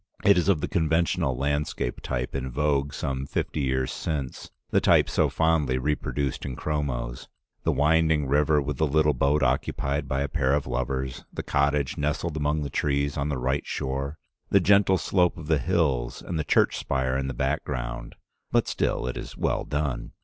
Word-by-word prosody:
It 100 Hz, -, +7 dB
is 90 Hz, +2 st, +2 dB
of 85 Hz, -7 st, +3 dB
the -, -, -1 dB
conventional 80 Hz, -4 st, +1 dB
landscape 70 Hz, -2 st, -1 dB
type 65 Hz, -1 st, -3 dB
in 65 Hz, -1 st, -3 dB
vogue 70 Hz, +1 st, 0 dB
some 65 Hz, 0 st, -3 dB
fifty 75 Hz, -, -2 dB
years 65 Hz, -2 st, 0 dB
since, 70 Hz, -5 st, -4 dB, 0.2 s
the -, -, +3 dB
type -, -, +5 dB
so -, -, +2 dB
fondly 80 Hz, -5 st, +2 dB
reproduced 70 Hz, 0 st, -2 dB
in 65 Hz, -2 st, -4 dB
chromos 70 Hz, -6 st, -3 dB, 0.2 s
— -, -, -49 dB
the -, -, +3 dB
winding 80 Hz, 0 st, +3 dB
river 75 Hz, +2 st, +3 dB
with 70 Hz, -1 st, -3 dB
the 80 Hz, -, +2 dB
little 75 Hz, +1 st, +3 dB
boat 70 Hz, +3 st, +2 dB
occupied 70 Hz, +1 st, 0 dB
by 65 Hz, +1 st, -1 dB
a 70 Hz, -, 0 dB
pair 65 Hz, 0 st, +1 dB
of 75 Hz, -, -1 dB
lovers, 65 Hz, +1 st, -3 dB
the -, -, -5 dB
cottage 70 Hz, -1 st, +1 dB
nestled 75 Hz, +2 st, -1 dB
among 75 Hz, 0 st, 0 dB
trees 70 Hz, 0 st, 0 dB
on 70 Hz, +1 st, -1 dB
the 70 Hz, -, -1 dB
right 65 Hz, +3 st, -1 dB
shore, 70 Hz, +3 st, -3 dB, 0.3 s
the 100 Hz, -, +5 dB
gentle 100 Hz, 0 st, +4 dB
slope 90 Hz, -1 st, +1 dB
of 85 Hz, -, -8 dB
the 80 Hz, -1 st, +2 dB
hills 70 Hz, -8 st, 0 dB
and 85 Hz, -3 st, -3 dB
the -, -, 0 dB
church -, -, +3 dB
spire 65 Hz, -1 st, -1 dB
in 65 Hz, 0 st, -1 dB
the 65 Hz, -, -3 dB
background 60 Hz, -2 st, -3 dB, 0.2 s
— -, -, -50 dB
but -, -, +2 dB
still -, -, -1 dB
it 65 Hz, -, -3 dB
is -, -, -7 dB
well -, -, 0 dB
done. 75 Hz, -4 st, -2 dB
70 Hz, 185 wpm, -26 LUFS, 65-75 Hz, 0.3 s, It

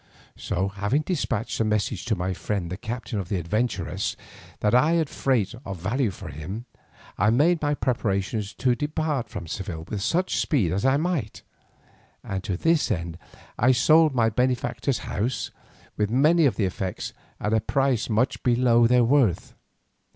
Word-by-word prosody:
So 95 Hz, +3 st, -2 dB
having 100 Hz, +9 st, 0 dB
despatched 145 Hz, -, -2 dB
a -, -, +3 dB
message 105 Hz, -2 st, -1 dB
to 115 Hz, -, +1 dB
my 95 Hz, +1 st, -2 dB
friend 95 Hz, -2 st, -3 dB
the -, -, -2 dB
captain 115 Hz, 0 st, -4 dB
of 95 Hz, -, -5 dB
the 100 Hz, -, 0 dB
"Adventuress," 95 Hz, 0 st, -1 dB, 0.5 s
that 105 Hz, -, +2 dB
I 150 Hz, +7 st, +5 dB
had 165 Hz, -4 st, +1 dB
freight 120 Hz, -6 st, 0 dB
of 95 Hz, -5 st, -6 dB
value 115 Hz, +8 st, 0 dB
for 90 Hz, -4 st, -8 dB
him, 85 Hz, -, -6 dB, 0.5 s
I 105 Hz, -, +4 dB
made 155 Hz, +9 st, +3 dB
my 145 Hz, -1 st, +1 dB
preparations 105 Hz, -5 st, -1 dB
to 125 Hz, -2 st, +2 dB
depart 145 Hz, -2 st, -2 dB
from 85 Hz, -, -6 dB
Seville 85 Hz, -1 st, -5 dB
with 105 Hz, -2 st, -3 dB
such 180 Hz, -, 0 dB
speed 115 Hz, -, +1 dB
as 100 Hz, +5 st, -1 dB
I 135 Hz, +1 st, +4 dB
might, 155 Hz, -9 st, -2 dB, 0.8 s
and 95 Hz, -1 st, -4 dB
to 95 Hz, -, -2 dB
this 165 Hz, -, +2 dB
end 85 Hz, -4 st, -3 dB, 0.4 s
I 125 Hz, +3 st, +5 dB
sold 155 Hz, +4 st, +5 dB
my 115 Hz, -2 st, +3 dB
benefactor's 125 Hz, +2 st, 0 dB
house, 120 Hz, +5 st, -2 dB, 0.5 s
with 105 Hz, -1 st, +1 dB
many 150 Hz, +6 st, +4 dB
of 130 Hz, -, 0 dB
the 105 Hz, -, +1 dB
effects, 95 Hz, 0 st, -4 dB, 0.3 s
at 105 Hz, -, -1 dB
a 110 Hz, -, +3 dB
price 130 Hz, +1 st, 0 dB
much 115 Hz, +4 st, +1 dB
below 120 Hz, -1 st, +4 dB
their 125 Hz, 0 st, +4 dB
worth. 120 Hz, -, +2 dB
115 Hz, 165 wpm, -25 LUFS, 100-135 Hz, 0.8 s, I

